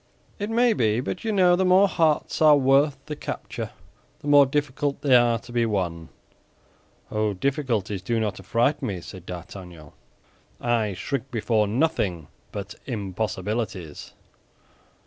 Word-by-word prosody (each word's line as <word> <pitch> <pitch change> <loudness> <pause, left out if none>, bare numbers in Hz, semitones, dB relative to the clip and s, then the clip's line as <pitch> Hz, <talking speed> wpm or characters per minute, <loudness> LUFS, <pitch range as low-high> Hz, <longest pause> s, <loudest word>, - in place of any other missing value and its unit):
"It 205 +1 -3
may 235 +1 +3
be; 110 - +1
but 145 +7 -4
you 225 - -1
know 180 -3 +5
the 190 - +1
more 185 +2 +5
hearts 160 -5 +1
are 150 -2 +7
worth 135 +1 +3
the 150 - -5
capture, - - -5 0.5
the - - -8
more 145 -1 +7
difficult 145 0 -1
they 135 -3 +5
are 120 -1 +4
to 120 - -13
be 120 -1 +1
won." 90 -7 -2 1.0
"Oh, 105 -1 0
difficulties 115 - -1
do 115 +4 -1
not 105 -3 -2
affright 120 +9 +1
me," 100 -9 -3
said 95 0 -11
D'Artagnan. 90 -3 -9 0.7
"I 115 -5 0
shrink 135 +6 -4
before 110 -3 +1
nothing 105 - 0 0.2
but - - -6
impossibilities." 100 -4 -4
120 Hz, 140 wpm, -25 LUFS, 100-145 Hz, 1.0 s, are